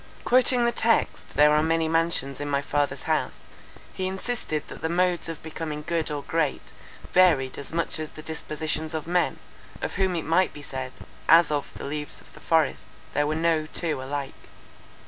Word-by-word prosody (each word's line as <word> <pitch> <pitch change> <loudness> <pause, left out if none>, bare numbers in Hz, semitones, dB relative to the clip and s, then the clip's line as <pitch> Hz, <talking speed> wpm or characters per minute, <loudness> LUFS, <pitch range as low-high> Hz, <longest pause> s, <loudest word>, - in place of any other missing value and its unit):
Quoting 250 -1 +4
the 235 - +3
text, 230 -1 0
there 150 0 +6
are 150 0 +4
many 160 0 +2
mansions 165 -4 0
in 145 0 -3
my 140 -1 +2
father's 145 0 0
house, - - -1 0.5
he 185 - -2
insisted 190 -5 -3
that - - -10
the 160 - -1
modes 175 -1 +1
of 165 - -7
becoming 155 -1 -5
good 165 -1 0
or 145 -1 -3
great, 160 -3 -1 0.4
varied 155 -8 +4
as 140 - -8
much 165 -1 -1
as 155 -1 -5
the 155 - -10
dispositions 160 0 -3
of 155 - -3
men, 175 +1 +1 0.4
of - - -3
whom 190 -2 +2
it 165 - -2
might 165 +4 +3
be 145 - -10
said, 130 -2 -5 0.4
as 165 0 +7
of 145 -1 -1
the - - -7
leaves 150 +1 -4
of - - -17
the - - -13
forest, 160 -3 +1 0.3
there 145 0 +2
were 155 - 0
no 160 -1 +1
two 155 -4 -2
alike. 140 +1 -4
160 Hz, 185 wpm, -26 LUFS, 145-170 Hz, 0.5 s, as